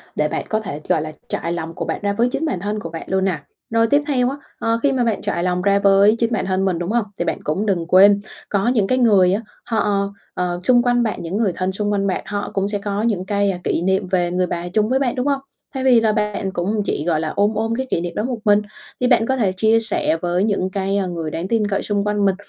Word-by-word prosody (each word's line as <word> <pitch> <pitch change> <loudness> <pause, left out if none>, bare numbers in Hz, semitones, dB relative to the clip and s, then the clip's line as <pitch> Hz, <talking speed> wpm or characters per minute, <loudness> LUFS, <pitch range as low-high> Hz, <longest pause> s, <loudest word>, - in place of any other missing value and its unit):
để 150 - +1
bạn - - -3
có 215 - +1
thể, 155 -8 -6
gọi 175 -4 +3
là, 155 0 -5 0.2
trải 170 - -2
lòng 165 -1 -4
của - - -4
bạn - - -3
ra 200 0 0
với 235 +4 +2
chính 315 - -1
bản 275 - -1
thân 210 +3 -3
của 165 - -6
bạn 165 0 -6
luôn 190 0 +1
nè. 180 -5 0 0.3
Rồi 230 0 +2
tiếp 285 +5 +3
theo 255 -4 +2
á, 275 - -5 0.2
ờ, 230 0 +1
khi 280 - +4
mà 260 -2 +1
bạn 225 -4 0
trải 170 - -2
lòng 180 0 0
ra 200 +1 +3
với 200 +2 +5
chính 230 0 +1
bản 220 - 0
thân 190 0 0
mình, 180 -3 0
đúng 175 +3 -3
hông? 235 -2 +1
Thì 175 - 0
bạn - - -1
cũng 185 +8 -1
đừng 185 -5 0
quên, 200 +3 +6 0.3
có 200 +1 0
những 230 -6 +2
cái 255 - +1
người 200 -7 +4
á 205 - 0 0.2
họ, 205 -4 0 0.2
ờ, 175 -1 -2
xung 240 +3 +4
quanh 245 -1 +2
bạn 215 -5 -2
những 170 +4 -3
người 215 -4 +1
thân 185 +1 -1
xung 205 +2 -2
quanh 200 -1 0
bạn, 185 - -1
họ 205 -1 -4
cũng 195 0 0
sẽ 205 0 -2
có 200 0 -2
những 210 -5 0
cái, 200 0 +1
a, 180 - -4
kỷ - - 0
niệm 190 +1 +1
về 180 -2 0
người 180 0 0
bà 175 0 -4
chung 215 +3 +1
với 260 +1 +2
bạn, 260 -3 0
đúng 255 +2 -1
hông? 280 -1 +1 0.3
Thay 265 -1 -3
vì 255 -3 +6
là 220 -1 +2
bạn 210 -2 -1
cũng 200 +4 -1
chỉ, 150 - -2
gọi 165 -3 +1
là, 160 0 -2
ôm 205 +2 +2
ôm 225 +1 -1
cái 260 +2 -2
kỷ 170 - 0
niệm 175 0 -5
đó 210 - -1
một 245 0 -2
mình 205 0 +5 0.4
thì 250 - +3
bạn 245 -3 +4
có 265 - +1
thể 210 -6 +2
chia 220 +4 +3
sẻ 220 -7 0
với 175 +1 0
những 200 -3 0
cái, 195 +1 -1
a, 195 - 0
người 165 -3 -4
đáng 170 +4 -3
tin 220 -1 +1
cậy 195 - 0
xung 205 -1 -1
quanh 210 -1 0
mình, 195 -1 +3
200 Hz, 290 wpm, -20 LUFS, 185-225 Hz, 0.4 s, quên